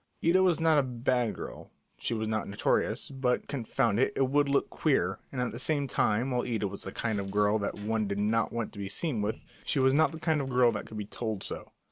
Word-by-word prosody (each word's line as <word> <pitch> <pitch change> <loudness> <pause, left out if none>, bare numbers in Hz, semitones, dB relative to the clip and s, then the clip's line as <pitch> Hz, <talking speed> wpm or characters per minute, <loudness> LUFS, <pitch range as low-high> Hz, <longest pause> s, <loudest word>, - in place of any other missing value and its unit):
Ida 180 +3 +5
was 180 -4 +3
not 160 -2 +4
a - - +5
bad 125 -2 0
girl, - - -8 0.3
she 115 - -1
was 110 0 -2
not 110 -1 -1
notorious, 100 - 0
but, 130 -2 0
confound 120 -4 0
it, 130 - +3
it 135 -1 +2
would 145 +1 +3
look 140 - +1
queer; 95 - +1
and 130 - -4
at 125 -1 0
the 120 - -6
same 145 0 +1
time, 120 0 +1
while 125 -1 +1
Ida 110 -5 -1
was 100 +1 -7
the 95 - -5
kind 110 -1 -2
of 95 0 -4
girl 105 +2 +2
that 100 - -3
one 110 0 0
did 100 0 -2
not 110 +2 +1
want 115 -2 -3
to 100 - -9
be 100 -1 -4
seen 130 - -1
with, 105 +2 -3 0.2
she - - 0
was 130 0 +4
not 155 +2 +4
the 160 - -8
kind 160 -2 +1
of 135 - -4
girl 125 -1 +4
that 105 - -5
could 110 - -8
be 105 - -3
told 110 -1 -4
so. - - -5
120 Hz, 250 wpm, -29 LUFS, 105-135 Hz, 0.3 s, Ida